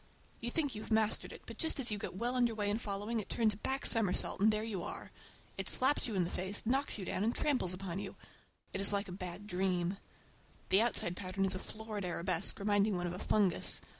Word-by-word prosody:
You 235 - -3
think 285 0 -1
you 215 - -5
have - - -9
mastered 220 -1 +1
it, - - -11
but - - -10
just 320 -3 +3
as 245 -4 +4
you 210 - -2
get - - -5
well 240 +5 -1
under 240 -3 +2
way 205 -1 0
in 215 - -1
following, 210 +2 -2
it 210 - -6
turns 220 -2 +3
a - - -10
back 265 +5 -2
somersault 210 -5 +3
and 215 +2 +6
there 215 0 -1
you 210 -5 -3
are. - - -6 0.5
It - - -2
slaps 265 +2 +2
you 220 - -3
in 185 - +2
the 170 - -3
face, 190 +4 -2
knocks 265 +3 0
you 195 - -5
down, 185 - -1
and 230 +2 +1
tramples 260 -11 +1
upon 185 -1 -4
you. - - -6 0.6
It 195 - -2
is 200 - +3
like 200 0 0
a - - -7
bad 180 +1 -6
dream. 185 -1 0 0.7
The 195 +3 +5
outside 215 -6 +2
pattern 190 0 -2
is 190 - +1
a 185 - -3
florid 215 0 -6
arabesque, 175 -1 +2
reminding 205 0 +2
one 175 - -2
of 175 - -3
a 180 - -6
fungus. 195 -5 +3
205 Hz, 240 wpm, -34 LUFS, 185-225 Hz, 0.7 s, and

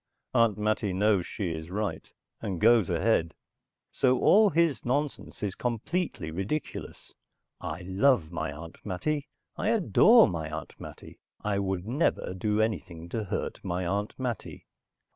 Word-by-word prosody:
Aunt 115 -4 +3
Mattie 105 -2 0
knows 100 -1 +2
she 95 -5 -3
is 80 +1 -6
right, 95 -4 -3 0.3
and 95 -4 -3
goes 115 -2 +5
ahead. 85 -1 +1 0.6
So 130 -1 +2
all 210 - +6
his 165 -5 +1
nonsense 140 -2 -2
is 100 -3 -1
completely 120 - -2
ridiculous. 100 - -5 0.5
I 90 - -5
love 95 - +2
my 80 -2 -3
Aunt 80 +3 -10
Mattie. 140 +10 -2 0.3
I - - -1
adore 225 +2 +6
my 80 -3 -3
Aunt 80 -1 -6
Mattie. - - -11 0.2
I 100 -1 0
would 95 -2 -2
never 125 - 0
do 105 +3 0
anything 90 -6 -2
to 110 +3 -3
hurt - - -4
my 90 +1 -2
Aunt 100 +4 -2
Mattie. 125 -3 -5
105 Hz, 145 wpm, -28 LUFS, 90-125 Hz, 0.6 s, all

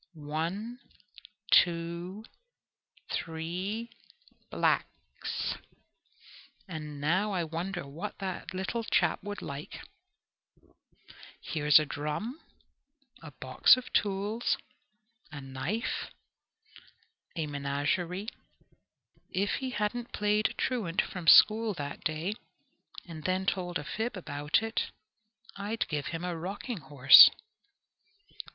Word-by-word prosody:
"One, 165 +11 -4 0.7
two, 175 +4 +2 0.9
three, 180 +8 -3 0.6
blacks! - - -1 1.1
Now 160 +4 -1
I 180 -2 0
wonder 170 +2 -4
what 165 +9 -6
that 190 -2 -5
little 190 +5 -3
chap - - +1
would 205 +1 -6
like 140 +2 -7 1.6
here's 150 -2 +4
a 155 - +3
drum, 150 - -4 0.8
a 160 - -9
box 130 - +4
of 255 - -8
tools, 205 +3 0 0.7
a 145 - -7
knife, 135 +12 -3 1.3
a 160 -3 -1
menagerie. 145 +7 -2 1.0
If 195 +2 0
he 265 -1 -3
hadn't 240 +1 -3
played 210 +1 +1
truant 205 -9 -1
from 180 -3 -7
school 215 +3 +7
that 145 -3 -6
day, 155 +6 -1 0.7
and 160 -3 -9
then 185 +1 0
told 180 -2 -1
a - - -6
fib 220 +8 -3
about 150 +2 0
it, 225 0 -2 0.7
I'd 210 +3 -2
give 150 -2 -2
him 165 0 -4
a 180 -1 -2
rocking 195 +6 -5
horse." 140 -2 +9
180 Hz, 95 wpm, -30 LUFS, 155-210 Hz, 1.6 s, horse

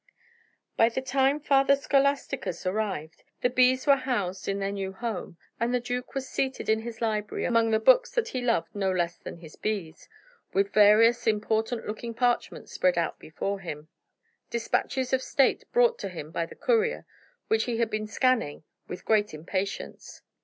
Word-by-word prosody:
By 225 - +5
the 235 - -3
time 270 +2 +2
Father 275 -1 +4
Scholasticus 275 -9 0
arrived, 185 -5 -3 0.2
the 245 - +2
bees 255 +1 +3
were 280 -2 +6
housed 205 -8 -2
in 195 - 0
their 195 0 -2
new 195 -1 -4
home, 200 -5 -5 0.2
and 235 +1 0
the 250 - +2
duke 245 +2 -5
was 265 -1 -3
seated 265 -2 -2
in 220 0 +3
his 230 0 -8
library, 215 -2 -1
among 230 -2 +3
the 220 - +3
books - - +5
that 475 - 0
he 255 - -3
loved 230 -8 0
no 195 -2 0
less 175 -2 -1
than - - -9
his 160 -2 -13
bees, 200 -7 -4 0.4
with 200 +1 +1
various 230 +3 +5
important 220 +2 0
looking 230 +2 -5
parchments 245 0 -1
spread - - +1
out - - -1
before 200 0 -4
him: 155 -4 -7 0.6
despatches 250 +2 -1
of 260 - +3
state 270 0 +2
brought 480 0 +3
to - - -4
him 160 -4 -8
by 165 0 -2
the - - -12
courier, 465 -1 +1 0.4
which 445 0 +2
he 240 -2 -2
had 230 -1 0
been 215 0 -2
scanning 225 - 0 0.2
with 180 - -8
great 210 -5 +2
impatience. 185 +5 -5
225 Hz, 175 wpm, -27 LUFS, 195-260 Hz, 0.6 s, were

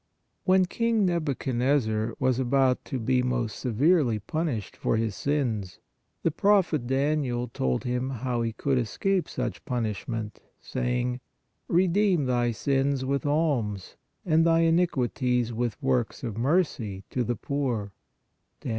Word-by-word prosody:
When 185 0 +5
King 225 +2 +1
Nabuchodnosor 130 -8 0
was 130 -1 +2
about 130 0 +2
to 135 - -3
be 125 +2 +2
most 125 -4 -2
severely 130 0 +2
punished 120 - -3
for - - 0
his 110 -2 -1
sins, 115 -9 -1 0.5
the 165 - +2
Prophet 175 -7 +2
Daniel 135 -2 0
told 65 - -1
him 125 +1 -1
how 125 -1 -2
he 115 -1 -1
could 130 +4 0
escape 180 - 0
such - - -4
punishment, 115 -4 -3 0.2
saying: 125 0 -2 0.2
" - - -49
Redeem 185 -3 +2
thy 120 -1 +1
sins 135 +3 0
with 140 +2 -1
alms 135 - 0 0.3
and 160 -2 +4
thy 165 0 +4
iniquities 130 -8 +1
with 115 -2 -2
works 125 -3 0
of 115 -5 -3
mercy 120 - 0
to 125 - 0
the 120 +1 -1
poor 120 -5 -2 0.4
" - - -49
(Dan. - - -5
130 Hz, 135 wpm, -27 LUFS, 115-150 Hz, 0.5 s, When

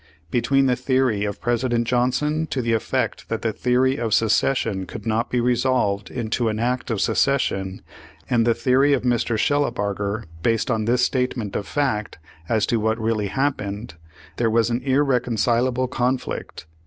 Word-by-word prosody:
Between 135 +3 +2
the 125 -2 +3
theory 130 -6 +1
of 100 0 -4
President 120 0 0
Johnson 130 +6 +1
to 130 -4 -2
the 115 0 +1
effect 110 - -2
that - - -3
the - - 0
theory 130 +2 +1
of 115 -4 +1
secession 110 -3 +1
could 105 +3 -8
not 115 +1 0
be 125 - 0
resolved 120 -5 +1
into 115 -1 -1
an 110 - -2
act 125 +3 -1
of 110 -3 -1
secession, 95 -10 0 0.4
and 120 -2 +2
the 115 0 +2
theory 135 +3 +3
of 135 - 0
Mr. 120 -2 +1
Shellabarger, 110 -6 0 0.2
based 115 +4 +1
on 110 -1 -1
his 125 +1 +3
state 125 -1 -1
ment 105 -4 -5
of 100 - -3
fact 130 -8 -1 0.3
as 110 -2 +2
to 115 - 0
what 110 +1 0
really 110 -2 0
happened, 110 - -2 0.4
there 115 -1 +2
was 115 +1 +2
an 120 +2 -1
irreconcilable 125 -2 +1
conflict. 125 +1 -3
120 Hz, 165 wpm, -22 LUFS, 110-130 Hz, 0.4 s, the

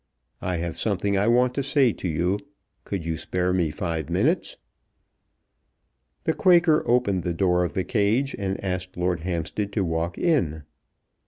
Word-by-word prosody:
I 90 -1 -1
have 85 0 -4
something 100 -1 0
I 100 +2 +2
want 125 +1 +3
to 140 - -1
say 135 -3 +3
to - - -5
you. 90 +5 0 0.5
Could 95 -5 -4
you 80 -1 -2
spare 90 0 -1
me 90 -4 +1
five 80 -2 -3
minutes?" - - 0 1.7
The 160 - +1
Quaker 170 -4 +4
opened 120 -6 +2
the 85 0 -2
door 90 0 +2
of 85 - -3
the 95 - 0
cage 115 +7 +1
and 95 -1 -2
asked 90 -1 -3
Lord 90 0 0
Hampstead 90 +4 -3
to 100 -2 0
walk 85 +2 -2
in. 85 - +1
95 Hz, 160 wpm, -25 LUFS, 85-115 Hz, 1.7 s, Quaker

